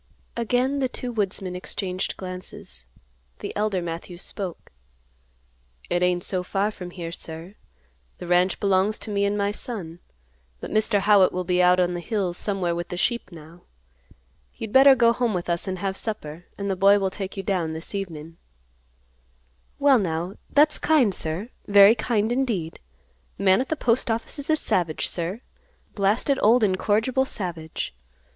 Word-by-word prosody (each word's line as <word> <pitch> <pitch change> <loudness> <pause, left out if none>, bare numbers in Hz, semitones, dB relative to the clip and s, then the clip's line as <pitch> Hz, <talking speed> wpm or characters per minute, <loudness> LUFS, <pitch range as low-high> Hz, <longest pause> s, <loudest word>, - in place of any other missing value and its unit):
Again 250 +4 0
the 260 -2 0
two 250 -1 -4
woodsmen 195 -4 -2
exchanged 185 0 -3
glances. 185 - -7 0.5
The - - -6
elder 205 -3 0
Matthews 175 +2 -6
spoke, 190 -5 -5 1.2
"It 175 - +1
ain't 180 -1 +2
so 185 -2 -1
far 195 +3 -1
from 180 -4 -8
here, 170 -2 -6
sir. 165 +3 -8 0.6
The - - -8
ranch 180 +2 +2
belongs 195 +2 +2
to 215 - -7
me 200 0 +1
and 200 +1 0
my 200 0 +1
son. 195 -7 -6 0.6
But - - -7
Mr. 215 -1 +2
Howitt 200 -2 +5
will 180 0 -2
be 180 0 +2
out 180 0 +5
on 180 -1 +2
the 175 - -3
hills 185 -2 -2
somewhere 190 -3 -1
with 175 0 -4
the 180 - -6
sheep 235 0 -1
now. 165 +1 -13 0.9
You'd 220 -1 -7
better 270 +1 +8
go 235 -2 +4
home 235 -4 0
with 175 - -3
us 170 +3 -2
and 185 0 -2
have 190 +1 -2
supper, 175 -7 -6
and 200 - -3
the 195 - 0
boy 200 +2 +5
will 195 -1 0
take 195 0 -6
you 195 - -3
down 180 -6 -1
this 160 +5 -6
evenin'." 165 -5 -6 1.4
"Well, 275 -3 +5
now, 175 -1 -2 0.2
that's 300 +1 +4
kind, 280 -10 +3
sir; 170 +9 -2 0.2
very 200 +1 +8
kind, 225 -1 0
indeed. 230 -11 -1 0.6
Man 190 +3 +4
at 260 - -4
the 315 - 0
Postoffice 230 -1 -1
is 285 - -6
a 315 - +5
savage, 175 - 0
sir; 180 +6 -3 0.5
blasted, 220 +7 +1
old 230 +2 +5
incorrigible 215 +6 +2
savage. 170 - -5
195 Hz, 165 wpm, -24 LUFS, 175-220 Hz, 1.4 s, better